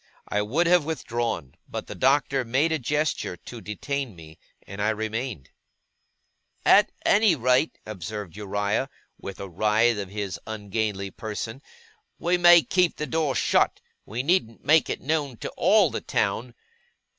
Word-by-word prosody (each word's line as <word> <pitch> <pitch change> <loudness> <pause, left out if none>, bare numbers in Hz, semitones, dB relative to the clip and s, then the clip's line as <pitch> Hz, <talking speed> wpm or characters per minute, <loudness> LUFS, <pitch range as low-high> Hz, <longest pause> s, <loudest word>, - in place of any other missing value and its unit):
I 105 - 0
would 135 +12 +1
have 175 -1 +4
withdrawn, 120 - -3 0.2
but - - -5
the - - -7
Doctor 135 0 +2
made 135 +7 +1
a 160 - 0
gesture 150 - -1
to 120 +7 -10
detain 130 +3 -4
me, 80 -1 -14 0.3
and 100 +1 -7
I 105 - +2
remained. 110 - -4 1.1
'At - - +6
any 205 -4 +5
rate,' 125 +3 +2
observed 105 -2 -6
Uriah, 105 +4 -1 0.3
with 100 -1 -8
a 100 - -5
writhe 105 +5 +2
of 100 -2 -5
his 100 -1 -4
ungainly 105 -2 -3
person, 110 +5 -6 0.6
'we 175 +1 +1
may 175 -1 +8
keep 180 -2 +2
the 150 - -3
door 150 -1 0
shut. - - +2 0.2
We 120 +5 -4
needn't 140 -8 0
make 155 +1 +4
it - - -3
known 145 -4 -1
to - - -5
ALL - - +4
the - - -3
town. 120 +1 -1
115 Hz, 150 wpm, -25 LUFS, 105-150 Hz, 1.1 s, may